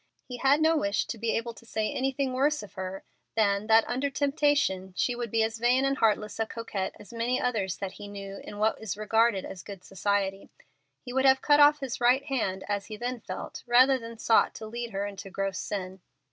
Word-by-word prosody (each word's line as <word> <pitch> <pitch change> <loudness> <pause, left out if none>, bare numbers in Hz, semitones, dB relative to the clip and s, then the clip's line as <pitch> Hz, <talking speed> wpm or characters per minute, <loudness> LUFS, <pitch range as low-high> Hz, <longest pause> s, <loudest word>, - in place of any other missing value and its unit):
He 250 - -6
had 275 +4 +3
no 320 +1 +4
wish 200 -9 0
to 230 - -6
be 230 0 0
able 230 +1 -4
to - - -16
say 220 -2 -2
anything 265 0 -1
worse 285 +1 +1
of 205 - -12
her 190 -1 -6 0.3
than 205 -1 +2
that 225 0 +5
under 260 +3 -1
temptation 275 - +1
she 245 - +1
would 240 -1 -4
be 225 +1 +2
as 225 0 -2
vain 250 +3 +3
and 275 0 +1
heartless 215 -1 +1
a 225 - 0
coquette 215 -5 -4
as 210 - -13
many 235 +2 0
others 210 -7 -1
that 195 -2 -4
he 205 - -10
knew 195 -1 -7
in 205 - -9
what 215 +1 +1
is 215 -2 -4
regarded 220 -1 +2
as 185 - -8
good 195 -3 -10
society. 195 0 -1 0.6
He 245 - -6
would 265 +1 +2
have 265 0 +5
cut 290 0 +5
off 295 0 +6
his 260 -3 -4
right 250 +3 +4
hand, 210 -9 -2
as 205 -1 -2
he 215 -1 -7
then 245 +2 -3
felt, 185 -3 -7
rather 255 +2 +5
than 230 -1 -8
have 230 - -13
sought 225 - +3
to 220 - -7
lead 235 +2 -5
her 200 -1 -3
into 200 -1 -7
gross 195 0 -3
sin. 190 -2 -5
225 Hz, 225 wpm, -28 LUFS, 200-255 Hz, 0.6 s, off